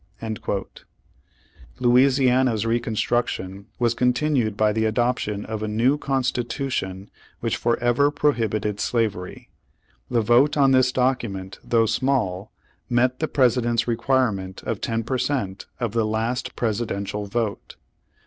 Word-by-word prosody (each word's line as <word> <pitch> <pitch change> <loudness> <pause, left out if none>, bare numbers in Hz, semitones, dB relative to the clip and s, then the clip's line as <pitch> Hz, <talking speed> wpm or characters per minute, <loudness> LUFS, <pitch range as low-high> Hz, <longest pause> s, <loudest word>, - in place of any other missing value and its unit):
^ 110 -3 -3 1.1
Louisiana's 125 -2 +3
reconstruction 110 -4 -1
was 120 -1 +2
continued 125 -3 +1
by 105 0 +3
the 110 +1 0
adoption 110 -2 0
of 110 -1 -5
a 110 - -2
new 115 +6 +2
constitution 125 -7 -2 0.3
which - - -1
forever 120 +4 +2
prohibited 110 -8 0
slavery. 105 -6 -2 0.6
The 120 - +2
vote 125 +7 +4
on 135 -2 +5
this 130 -1 +4
document 115 -7 -1
though 115 -1 +2
small, 110 -5 -1 0.4
met 125 +1 +2
the 155 - 0
President's 120 -4 +2
requirement 115 -6 0
of - - -3
ten 115 0 -1
per 130 +3 -2
cent, 100 -10 -2
of 120 -4 -1
the 115 0 +1
last 115 +3 -2
Presidential 105 -3 -2
vote. 110 0 -3
120 Hz, 120 wpm, -23 LUFS, 105-125 Hz, 1.1 s, on